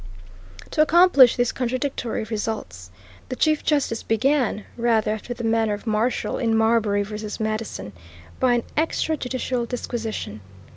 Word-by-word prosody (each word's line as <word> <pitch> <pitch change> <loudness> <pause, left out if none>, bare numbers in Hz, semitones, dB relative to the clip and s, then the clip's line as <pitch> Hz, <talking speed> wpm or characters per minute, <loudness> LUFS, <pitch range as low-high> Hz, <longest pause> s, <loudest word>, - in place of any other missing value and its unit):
To 305 - +2
accomplish 310 -6 +6
these 245 -1 +1
contradictory 255 -2 -2
results, 210 - -5 0.4
the 255 - -3
Chief 310 +2 +1
Justice 280 -7 0
began, 245 -2 +1
rather 230 -3 +1
after 220 +3 -5
the 235 - -7
manner 225 -2 +1
of 205 - -12
Marshall 225 +2 0
in 225 -3 +1
Marbury 220 -2 +2
v. 210 +1 -6
Madison, 215 - -3 0.5
by 250 -2 +3
an 235 - 0
extra 315 0 0
judicial 250 -3 -3
disquisition. 225 - -4
230 Hz, 135 wpm, -23 LUFS, 215-255 Hz, 0.5 s, accomplish